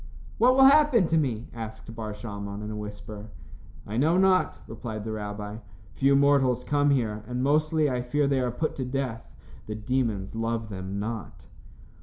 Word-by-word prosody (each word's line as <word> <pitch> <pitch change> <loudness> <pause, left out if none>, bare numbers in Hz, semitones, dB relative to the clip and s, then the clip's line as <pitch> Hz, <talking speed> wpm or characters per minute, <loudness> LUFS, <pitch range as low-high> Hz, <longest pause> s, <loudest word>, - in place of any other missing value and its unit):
"What 250 +2 +5
will 270 - +6
happen 280 -7 +6
to 165 - +2
me?" 120 -6 -2
asked 115 0 -8
Bar 110 -2 -5
Shalmon, 100 -2 -6
in 105 - -5
a - - -5
whisper. 105 0 -8 0.6
"I 105 +3 -4
know 160 +7 +3
not," 190 -1 +3
replied 110 -2 -6
the 110 - -4
rabbi. 105 0 -5 0.4
"Few 140 +1 +3
mortals 135 -3 +3
come 145 +1 +2
here, 110 -6 0
and 125 0 -2
mostly, 155 +2 +2
I 125 -3 -1
fear 140 +4 0
they 140 -1 +2
are 125 - 0
put 155 +7 -2
to 135 - -2
death. 125 -3 -3 0.4
The 105 - -4
demons 110 -3 -1
love 115 0 -2
them 95 0 -5
not." 110 +1 -5
120 Hz, 175 wpm, -27 LUFS, 105-140 Hz, 0.6 s, will